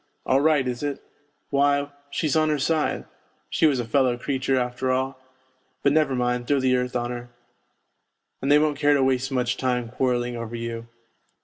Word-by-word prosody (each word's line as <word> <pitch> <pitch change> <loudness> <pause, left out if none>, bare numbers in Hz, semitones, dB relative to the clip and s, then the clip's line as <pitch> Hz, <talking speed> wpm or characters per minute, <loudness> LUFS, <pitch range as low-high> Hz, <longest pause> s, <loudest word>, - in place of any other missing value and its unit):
' - - -45
All 135 +1 +3
right, 150 -4 +3
is 125 -1 -3
it? 145 -2 -2 0.5
Why, 140 0 +2 0.2
she's 150 +1 -1
on 155 -1 +3
her 150 - +1
side! 155 +2 0 0.5
She 160 - +4
was 140 -4 +1
a 120 - -2
fellow 125 +1 +2
creature, 130 +1 -1
after 125 +1 -1
all! 130 +1 -1 0.6
But, 140 - +4
never 155 -4 +2
mind, 125 -1 -1
throw 145 -1 +3
the 130 -1 +2
earth 125 0 -2
on 120 0 -1
her.' 120 0 -7 1.1
And 135 - 0
they 145 - +8
won't 150 -1 +1
care 145 0 +4
to 135 - +3
waste 130 0 +1
much 125 -2 0
time 125 -3 -1
quarrelling 125 -1 -1
over 115 0 -5
you. 115 0 -5
130 Hz, 190 wpm, -24 LUFS, 125-145 Hz, 1.1 s, they